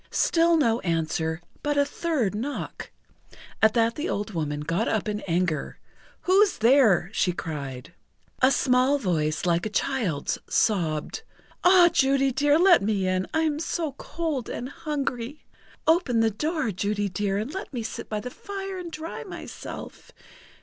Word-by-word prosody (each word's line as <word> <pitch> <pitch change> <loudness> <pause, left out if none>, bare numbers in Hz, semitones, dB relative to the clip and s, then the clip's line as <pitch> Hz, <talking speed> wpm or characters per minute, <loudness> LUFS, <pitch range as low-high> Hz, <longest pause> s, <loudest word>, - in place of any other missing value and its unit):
Still 335 0 +3
no 235 -6 +2
answer, 160 -2 -1 0.2
but 290 0 -1
a 285 - +4
third 285 - -1
knock. 250 +8 -5 0.7
At 220 +1 +4
that 230 0 +3
the 305 +7 -3
old 210 +2 -2
woman 150 -3 -2
got 165 +8 -1
up 220 -1 0
in 210 0 -2
anger. 170 -3 -1 0.4
"Who's 390 +2 +3
there?" 225 -6 +4
she 180 -4 +1
cried. 140 -2 -6 0.5
A 260 - +6
small 255 +1 +3
voice, 155 - -1
like 170 -1 +2
a - - -5
child's, 210 - -1
sobbed: 170 - 0 0.4
"Ah, 360 -1 +7
Judy 270 0 +3
dear, 290 +3 +3
let 355 +1 +6
me 200 -2 0
in! 185 0 0
I 320 - +1
am 305 -2 0
so 325 -1 -2
cold 290 -2 -4
and 250 - -5
hungry! 280 -3 -4 0.4
Open 315 -8 +3
the 225 0 +3
door, 300 - -1
Judy 205 +2 -1
dear, 195 +1 -1
and 220 +8 -3
let 385 +3 -6
me 245 -4 -4
sit 220 - -6
by 215 - -2
the 250 +4 -6
fire 390 +1 -6
and 345 -2 -7
dry 320 +1 -6
myself! - - -9
230 Hz, 155 wpm, -26 LUFS, 185-300 Hz, 0.7 s, Ah